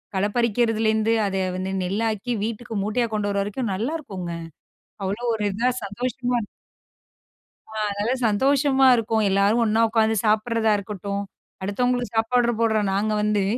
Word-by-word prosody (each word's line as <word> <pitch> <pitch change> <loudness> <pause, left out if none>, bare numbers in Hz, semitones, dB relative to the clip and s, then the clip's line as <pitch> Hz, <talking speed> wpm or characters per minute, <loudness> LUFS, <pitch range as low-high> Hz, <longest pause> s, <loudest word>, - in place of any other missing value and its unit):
களப்பறிக்கிறதுலேருந்து, 220 +1 +1
அத 195 - -3 0.2
வந்து 185 +1 -3
நெல்லாக்கி, 215 +4 -1
வீட்டுக்கு 225 +1 -4
மூட்டையா 230 +4 0
கொண்டு 210 -1 0
வர்ற 200 0 0
வரைக்கும் 210 +2 -3
நல்லாயிருக்குங்க. 205 - -4 0.7
அவ்ளோ 200 +5 -3
ஒரு 215 -1 -2
இதா, 230 +6 +1 0.2
சந்தோஷமா 245 +4 -2 1.3
ஆ - - -11 0.2
அதனால 205 +4 -1
சந்தோஷமா 270 +4 +3
இருக்கும். 225 -1 0
எல்லாரும் 200 +4 +3
ஒண்ணா 220 +1 +2
உட்காந்து 220 0 +2
சாப்பிடறதா 220 +1 +2
இருக்கட்டும், 200 0 -4 0.4
அடுத்தவங்களுக்கு 245 +5 -1
சாப்பாடுற 240 +1 +2
போடுறோம் 220 -3 +2
நாங்க 210 +2 0
வந்து 210 -1 +1
220 Hz, 125 wpm, -23 LUFS, 205-240 Hz, 1.3 s, சந்தோஷமா